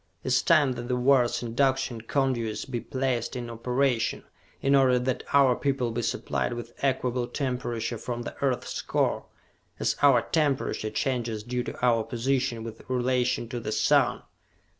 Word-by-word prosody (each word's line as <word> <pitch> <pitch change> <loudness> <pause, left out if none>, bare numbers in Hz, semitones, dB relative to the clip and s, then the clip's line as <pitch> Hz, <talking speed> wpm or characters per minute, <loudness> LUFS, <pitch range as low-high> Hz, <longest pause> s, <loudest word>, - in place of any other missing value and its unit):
It - - -3
is 130 - +4
time 155 -6 +4
that 120 -1 -5
the 125 - 0
world's 125 -1 +3
Induction 130 0 0
Conduits 120 -3 -1
be 120 -3 -4
placed 130 0 -2
in 120 -1 -5
operation, 125 +1 0 0.4
in 135 - +2
order 130 -2 +5
that 125 0 -1
our 135 -3 +5
people 135 -4 -1
be 120 +1 -2
supplied 120 - -1
with 120 0 -7
equable 125 -2 0
temperature 120 -4 -3
from 120 +1 -4
the - - -7
Earth's 135 -3 -1
Core, - - 0 0.5
as - - +1
our 135 -5 +5
temperature 145 -8 0
changes 120 -5 -2
due 125 +2 -2
to 120 - -6
our 115 -2 +3
position 125 0 -1
with 115 -1 -8
relation 125 -1 0
to 120 - -4
the 110 - -4
sun! - - +2
125 Hz, 160 wpm, -27 LUFS, 120-135 Hz, 0.5 s, order